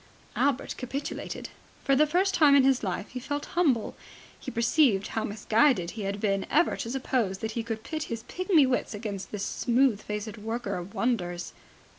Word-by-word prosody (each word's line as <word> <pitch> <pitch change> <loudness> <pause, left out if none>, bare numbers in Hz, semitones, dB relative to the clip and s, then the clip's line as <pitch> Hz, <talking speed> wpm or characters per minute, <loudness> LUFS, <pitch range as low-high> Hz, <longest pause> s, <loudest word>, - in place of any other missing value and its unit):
Albert 275 -2 +1
capitulated. 270 +3 -5 0.3
For 275 - +3
the 305 +3 +4
first 370 +5 +2
time 295 -4 +6
in 275 - +6
his 265 -1 +3
life 195 +1 -2
he 250 - -6
felt 290 +3 -3
humble. 285 -11 +1 0.4
He - - -6
perceived 235 -4 +2
how 220 - -2
misguided 215 -2 +2
he 225 - -7
had 200 +1 -3
been 195 -2 0
ever 215 - +3
to 230 - -4
suppose 245 -6 -1
that 220 +2 -4
he 230 - -2
could 225 -1 -5
pit 310 -1 -4
his 230 -1 -5
pigmy 350 +1 +3
wits 250 -3 -1
against 205 -2 -5
this 205 -1 -3
smooth 245 -3 +2
faced 210 +1 -5
worker 225 -1 -3
of 180 +2 -8
wonders. 175 -8 -1
230 Hz, 180 wpm, -28 LUFS, 205-270 Hz, 0.4 s, time